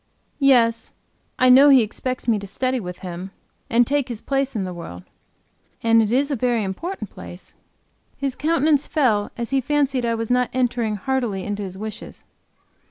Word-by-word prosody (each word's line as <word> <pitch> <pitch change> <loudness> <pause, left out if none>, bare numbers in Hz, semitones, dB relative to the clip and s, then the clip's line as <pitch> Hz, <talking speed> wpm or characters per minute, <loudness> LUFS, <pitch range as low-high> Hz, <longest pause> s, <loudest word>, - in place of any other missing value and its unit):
"Yes, 235 -5 +3 0.4
I 255 - +4
know 270 +3 +8
he 265 -4 +7
expects 250 +4 -5
me 225 -3 +2
to 200 - -8
study 255 +6 -1
with 180 -4 -7
him, 180 +2 -6 0.4
and 240 +1 +4
take 285 +1 0
his 235 -3 -5
place 275 0 -1
in 205 - -1
the 185 -1 -5
world." 125 - -9 0.8
"And 230 0 +5
it 215 -1 0
is 280 +4 +1
a - - +1
very 240 -2 0
important 215 - -5
place." 175 - -11 0.6
His 275 -2 -2
countenance 305 -1 +1
fell 220 -9 +1
as 235 0 -4
he 270 -1 +2
fancied 275 -2 0
I 230 -1 0
was 225 +1 -3
not 250 0 +2
entering 240 -4 0
heartily 225 -3 -2
into 205 0 -4
his 190 -2 -6
wishes. 215 +1 -8
240 Hz, 175 wpm, -22 LUFS, 210-265 Hz, 0.8 s, know